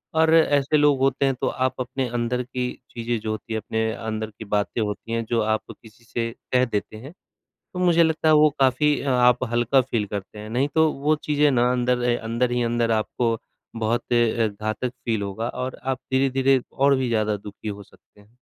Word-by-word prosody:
और 160 Hz, 0 st, +4 dB
ऐसे 145 Hz, -2 st, +3 dB
लोग 145 Hz, -2 st, +4 dB
होते 135 Hz, +1 st, +2 dB
हैं, 135 Hz, -1 st, +1 dB
तो -, -, -2 dB
आप 130 Hz, 0 st, 0 dB
अपने 130 Hz, +1 st, -2 dB
अंदर 120 Hz, +1 st, -1 dB
की 125 Hz, 0 st, -3 dB, 0.2 s
चीज़ें 115 Hz, 0 st, -2 dB
जो 110 Hz, 0 st, -4 dB
होती 110 Hz, +1 st, -5 dB
हैं, 110 Hz, -, -2 dB
अपने 110 Hz, +1 st, -1 dB
अंदर 110 Hz, -1 st, -4 dB
की 110 Hz, +1 st, -10 dB
बातें 105 Hz, +3 st, -1 dB
होती 105 Hz, +1 st, -4 dB
हैं, 115 Hz, 0 st, 0 dB
जो 115 Hz, 0 st, 0 dB
आप 110 Hz, 0 st, 0 dB, 0.2 s
किसी 110 Hz, +1 st, -17 dB
से 115 Hz, 0 st, -3 dB, 0.2 s
कह 125 Hz, 0 st, +4 dB
देते 110 Hz, -2 st, -4 dB
हैं, 135 Hz, +8 st, -10 dB, 0.6 s
तो 180 Hz, -, -5 dB
मुझे 170 Hz, -2 st, +4 dB
लगता 160 Hz, 0 st, 0 dB
है, -, -, +6 dB
वो 150 Hz, 0 st, +6 dB
काफ़ी 135 Hz, +3 st, +3 dB
आप 125 Hz, -2 st, +3 dB
हल्का 120 Hz, +3 st, +3 dB
फ़ील 115 Hz, -4 st, -2 dB
करते 100 Hz, +1 st, -6 dB
हैं। 105 Hz, +1 st, -8 dB
नहीं, 125 Hz, +5 st, +1 dB
तो 160 Hz, -1 st, +4 dB
वो 150 Hz, +3 st, +1 dB
चीज़ें 150 Hz, 0 st, +3 dB
ना, 125 Hz, -1 st, +3 dB
अंदर 125 Hz, 0 st, +1 dB
ए 120 Hz, -, +3 dB
अंदर 115 Hz, +2 st, -1 dB
ही 120 Hz, 0 st, +1 dB
अंदर 115 Hz, 0 st, 0 dB
आपको 115 Hz, +1 st, 0 dB, 0.4 s
बहुत 115 Hz, +2 st, -1 dB
अ, 115 Hz, -1 st, +2 dB
घातक 110 Hz, +4 st, -3 dB, 0.2 s
फ़ील 115 Hz, -3 st, 0 dB
होगा 100 Hz, +4 st, -3 dB
और 130 Hz, 0 st, -5 dB
आप 130 Hz, 0 st, -1 dB, 0.2 s
धीरे-धीरे 135 Hz, 0 st, +3 dB
और 140 Hz, +1 st, +3 dB
भी 130 Hz, -1 st, -1 dB
ज़्यादा 110 Hz, -2 st, 0 dB
दुखी 105 Hz, +2 st, -10 dB
हो 100 Hz, 0 st, -7 dB
सकते 105 Hz, -, -24 dB
हैं। 105 Hz, +4 st, -25 dB
120 Hz, 210 wpm, -23 LUFS, 110-135 Hz, 0.6 s, है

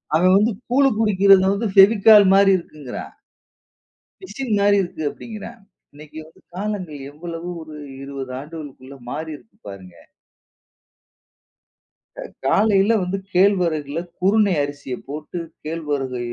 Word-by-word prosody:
அவன் 180 Hz, +3 st, +4 dB
வந்து 215 Hz, +4 st, +2 dB, 0.2 s
கூழு 270 Hz, +2 st, +4 dB
குடிக்குறத 195 Hz, -3 st, +4 dB
வந்து 215 Hz, +2 st, -2 dB
பெவிகால் 205 Hz, +1 st, +7 dB
மாரி 195 Hz, 0 st, +5 dB
இருக்குங்குறான். 150 Hz, -6 st, -9 dB, 1.1 s
பிசின் 270 Hz, -10 st, -6 dB
மாறி 200 Hz, 0 st, +3 dB
இருக்கு 175 Hz, -3 st, -6 dB
அப்டிங்குறான். 220 Hz, 0 st, -10 dB, 0.3 s
இன்னைக்கு 150 Hz, +1 st, -13 dB
வந்து 160 Hz, -, -20 dB, 0.2 s
காலங்கள் 185 Hz, -6 st, -4 dB
எவ்வளவு 165 Hz, +3 st, -7 dB
ஒரு 155 Hz, -1 st, -11 dB, 0.3 s
20 135 Hz, -2 st, -7 dB
ஆண்டுகளுக்குள்ள 140 Hz, -3 st, -10 dB
மாறி 160 Hz, +3 st, -5 dB
இருக்கு 215 Hz, +4 st, -26 dB
பாருங்க. 95 Hz, -3 st, -12 dB, 2.3 s
அ -, -, -5 dB, 0.2 s
காலைல 205 Hz, +5 st, +3 dB
வந்து 185 Hz, +2 st, -2 dB, 0.2 s
கேழ்வரகுல 170 Hz, -6 st, +1 dB, 0.2 s
குருணை 200 Hz, +2 st, +3 dB
அரிசிய 145 Hz, -2 st, -6 dB
போட்டு 150 Hz, +4 st, -7 dB, 0.3 s
கேழ்வரகு, 145 Hz, -5 st, -3 dB
175 Hz, 110 wpm, -21 LUFS, 150-200 Hz, 2.3 s, பெவிகால்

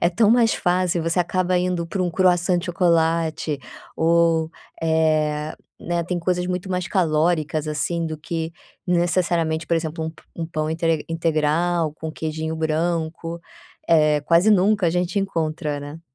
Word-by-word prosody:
é 170 Hz, -, +4 dB
tão 210 Hz, +4 st, +3 dB
mais 230 Hz, -1 st, +4 dB
fácil. 180 Hz, -2 st, +1 dB
Você 165 Hz, +2 st, 0 dB
acaba 180 Hz, +1 st, +1 dB
indo 180 Hz, -2 st, -1 dB
para 185 Hz, +2 st, -2 dB
um 175 Hz, -, 0 dB
croissant 180 Hz, 0 st, +2 dB
de 185 Hz, -, -7 dB
chocolate 165 Hz, -4 st, +1 dB, 0.4 s
ou, 165 Hz, -1 st, +3 dB, 0.3 s
eh, 155 Hz, -2 st, +1 dB, 0.2 s
né, 170 Hz, 0 st, -2 dB
tem 180 Hz, 0 st, -2 dB
coisas 180 Hz, +1 st, -1 dB
muito 180 Hz, +1 st, -3 dB
mais 180 Hz, -1 st, -1 dB
calóricas, 155 Hz, -3 st, +1 dB
assim, 165 Hz, +2 st, -1 dB
do 155 Hz, -1 st, -4 dB
que 165 Hz, +1 st, -4 dB, 0.3 s
necessariamente, 170 Hz, -2 st, +1 dB
por 170 Hz, -, +1 dB
exemplo, 160 Hz, 0 st, -3 dB
um 160 Hz, -, -3 dB
p 160 Hz, -, -19 dB
um 165 Hz, -1 st, -3 dB
pão 155 Hz, -1 st, -2 dB
intre 160 Hz, -1 st, 0 dB
integral 165 Hz, 0 st, +1 dB
com 160 Hz, 0 st, -6 dB
queijinho 160 Hz, 0 st, -4 dB
branco, 165 Hz, +1 st, -2 dB, 0.5 s
eh, 155 Hz, -2 st, +4 dB
quase 170 Hz, +7 st, +4 dB
nunca 200 Hz, -1 st, +3 dB
a -, -, +3 dB
gente 180 Hz, +3 st, 0 dB
encontra, 155 Hz, -5 st, -2 dB
né. 145 Hz, +3 st, -8 dB
165 Hz, 155 wpm, -22 LUFS, 160-180 Hz, 0.5 s, é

